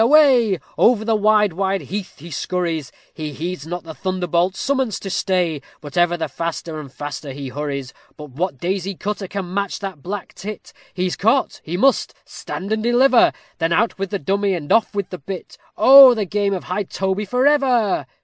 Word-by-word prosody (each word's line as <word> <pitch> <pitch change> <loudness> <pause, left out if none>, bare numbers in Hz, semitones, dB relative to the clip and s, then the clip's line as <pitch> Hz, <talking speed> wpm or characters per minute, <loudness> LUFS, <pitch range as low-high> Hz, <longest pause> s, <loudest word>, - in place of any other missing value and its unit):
away! 245 -6 +5 0.2
Over 225 -3 +4
the 225 - +2
wide 210 -2 +3
wide 195 +2 -1
heath 200 0 -6
he 165 +3 -11
scurries; 165 -6 -2 0.2
He 155 -2 -6
heeds 165 +1 -5
not 175 +1 -5
the 165 -1 -8
thunderbolt 180 +3 -1
summons 265 -6 -1
to 195 - -6
stay, 180 -6 0 0.2
But 145 -2 -10
ever 175 0 +3
the 165 - -2
faster 165 -1 -4
and 140 -3 -9
faster 145 0 -6
he 140 -1 -6
hurries. 140 -1 -4 0.2
But 150 -2 -10
what 165 +2 -2
daisy 190 +4 -2
cutter 205 +1 -4
can 185 -2 -5
match 200 -1 -1
that 190 -7 -7
black 195 +4 -6
tit? 210 +1 -8 0.2
He 185 0 0
is 180 - -1
caught 225 +6 +1
he 170 +3 -4
must 270 +7 +2
"stand 195 +3 -7
and 220 - -1
deliver;" 245 +2 +4 0.3
Then 165 0 0
out 220 0 +1
with 195 -1 -2
the 200 - -1
dummy, 195 +4 0
and 150 -4 -6
off 225 -2 +3
with 200 -2 -3
the 180 - -6
bit, 185 +6 -7 0.2
Oh! 265 +2 +9
the 215 -2 -1
game 200 +1 0
of 180 - -5
high 185 +3 -2
toby 190 +3 -2
for 250 +6 +1
ever! 250 - +2
190 Hz, 195 wpm, -20 LUFS, 165-210 Hz, 0.3 s, Oh